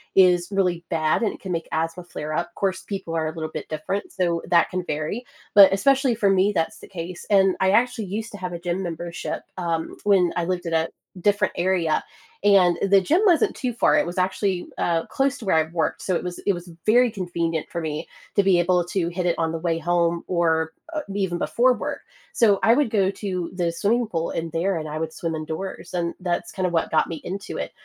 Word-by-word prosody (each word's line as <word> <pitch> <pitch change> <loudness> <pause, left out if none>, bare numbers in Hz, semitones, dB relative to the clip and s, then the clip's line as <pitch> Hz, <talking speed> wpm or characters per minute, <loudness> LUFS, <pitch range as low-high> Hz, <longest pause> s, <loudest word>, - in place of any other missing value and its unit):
is 180 -2 +5
really 180 -3 +1
bad, 155 -2 +1
and 225 - +1
it - - -12
can 190 - -5
make 165 -2 -2
asthma 165 +2 -2
flare 155 -3 -6
up, 170 +2 -2
‘course, 190 -2 -1
people 190 -4 -5
are 160 -1 0
a 155 - -4
little 160 -1 -4
bit - - -6
different, 155 +6 -3
so 170 -2 0
that 170 -1 +4
can 185 0 -2
vary, 155 +11 -3 0.3
but 200 -2 +9
especially 265 +4 +3
for 210 -3 +2
me, 195 +1 +3
that's 165 -3 -1
the - - -12
case, 175 -1 -7
and 195 -2 +4
I 190 - +4
actually 235 +1 +2
used 215 +4 -4
to - - -6
have 180 -1 -4
a 170 - -5
gym 175 +2 -2
membership, 170 0 -5
um, 165 -2 -2
when 190 -4 +3
I 175 - 0
lived 180 0 -2
in 165 - -3
a 160 0 +1 0.3
different 205 0 +2
area, 175 -3 +1 0.4
and 190 -4 +5
the 195 0 +5
gym 315 - +2
wasn't 345 -6 +4
too 250 - -2
far, 230 - +3
it - - +2
was 175 +2 -6
actually, 185 0 0
uh, 165 -1 0
close 275 0 0
to 230 - -10
where 190 - +2
I 160 - +4
worked, 165 -2 -1
so 185 - 0
it - - -2
was 180 -1 -5
it 200 - +1
was 175 0 -8 0.2
very 245 +3 +5
convenient 170 -5 -2
for 170 - -4
me 155 -2 -4 0.3
to 200 - +4
be 190 -2 +4
able 175 0 +3
to 175 -1 -1
hit 180 +1 -3
it 175 - +1
on 165 -1 +1
the 165 - -3
way 165 0 0
home 170 0 +1
or, 160 -2 +1 0.2
uh, 310 - -1
even 190 -4 0
before 245 +8 +3
work. - - -4 0.3
So 205 -4 +4
I 225 - +6
would 285 -1 +2
go 195 -3 +2
to 185 -4 -4
the 175 -2 0
swimming 215 +8 +1
pool 165 -4 -2
in 165 0 -3
there, 175 +4 0
and 155 -1 -5
I 150 - -4
would 160 0 -3
swim 165 -1 -3
indoors, 160 +6 -6
and 170 -1 -1
that's 175 -2 -2
kind 185 - -2
of 175 - -1
what 165 - +1
got 160 - +2
me 165 - -5
into 195 +2 -5
it, - - -4
180 Hz, 235 wpm, -24 LUFS, 165-195 Hz, 0.4 s, but